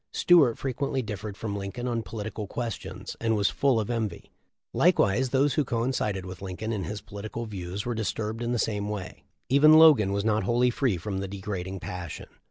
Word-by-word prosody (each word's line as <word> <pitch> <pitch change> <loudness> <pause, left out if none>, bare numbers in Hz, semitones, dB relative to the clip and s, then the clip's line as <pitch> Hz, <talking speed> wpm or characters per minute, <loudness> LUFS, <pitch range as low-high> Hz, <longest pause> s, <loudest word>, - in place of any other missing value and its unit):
Stuart 150 -10 +5
frequently 135 0 -2
differed 105 -1 -6
from 105 -2 -4
Lincoln 100 +5 -4
on 120 -2 -1
political 105 +1 -6
questions, 120 +2 -5
and 115 -1 +2
was 100 -1 +2
full 135 -5 +2
of 110 +2 -2
envy. 110 -6 -3 0.4
Likewise 125 +7 +3
those 135 +2 +2
who 150 - +2
coincided 115 -6 -1
with 95 -1 -8
Lincoln 100 +4 -4
in 100 -4 -3
his 105 0 -5
political 110 +3 -6
views 100 0 -5
were 120 - -1
disturbed 110 0 -3
in 120 0 -1
the 120 - +1
same 105 -2 -1
way. 95 -4 -6 0.2
Even 145 +4 +7
Logan 150 -11 +7
was 100 +1 -1
not 110 -1 +2
wholly 120 +5 +2
free 125 -6 0
from 95 +2 -4
the 95 - -3
degrading 95 -1 -5
passion. 90 -2 -6
110 Hz, 185 wpm, -27 LUFS, 100-120 Hz, 0.4 s, Even